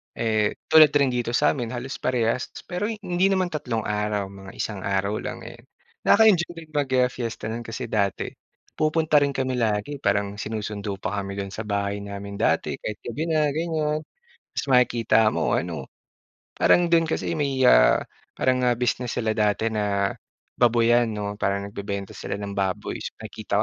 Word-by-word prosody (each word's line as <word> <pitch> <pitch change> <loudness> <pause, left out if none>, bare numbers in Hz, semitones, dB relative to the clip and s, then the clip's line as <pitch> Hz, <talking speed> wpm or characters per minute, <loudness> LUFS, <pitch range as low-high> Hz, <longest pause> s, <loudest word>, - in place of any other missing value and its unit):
Eh 110 -2 +1 0.2
tulad 155 -2 +8
rin 140 -3 +4
dito 120 -1 -1
sa - - +4
amin 120 -5 -3
halos 130 +3 -5
parehas 120 -1 0 0.2
pero 180 +4 -3
hindi 195 -4 0
naman 185 -2 +1
3 125 -8 -2
araw 105 -1 -2
mga 95 0 -11
1 105 -3 -3
araw 100 +1 0
lang - - -6
ayan. - - -10 0.4
Nakaka-enjoy 200 -6 +5
din, 165 -1 -11
ah, 145 -1 +1
mag-fiesta 125 -3 -1
nun 120 +1 -4
kasi 115 0 -5
dati 100 -4 0 0.4
pupunta 155 -1 +3
rin 140 - +1
kami 130 -1 -1
lagi 110 +4 0
parang 100 0 +1
sinusundo 105 -2 -4
pa 105 - -3
kami 100 0 -6
dun 100 - -3
sa 110 - -5
bahay 100 0 -1
namin 100 0 -7
dati - - +1
kahit 105 -1 -5
gabi 140 +7 -3
na 155 -1 +3
ganyan. 155 -2 0 0.5
Tapos - - -2
makikita 115 -3 +4
mo - - 0
ano 80 -6 -4 0.7
parang 175 - +5
dun 170 -1 +5
kasi 160 - -2
may 135 -3 0
ah, 125 - +6 0.3
parang, 130 -1 +1
ah, 120 - +4
business 125 0 -1
sila 110 -2 0
dati 105 +1 +2
na 100 -2 0 0.5
baboyan 120 0 +4
no 105 -1 -3
parang 100 0 -1
nag - - -23
bebenta 100 -1 -4
sila - - -5
ng 100 0 -5
baboy 100 +1 -2
so - - -6
nakikita 105 -1 -2
115 Hz, 170 wpm, -24 LUFS, 100-140 Hz, 0.7 s, tulad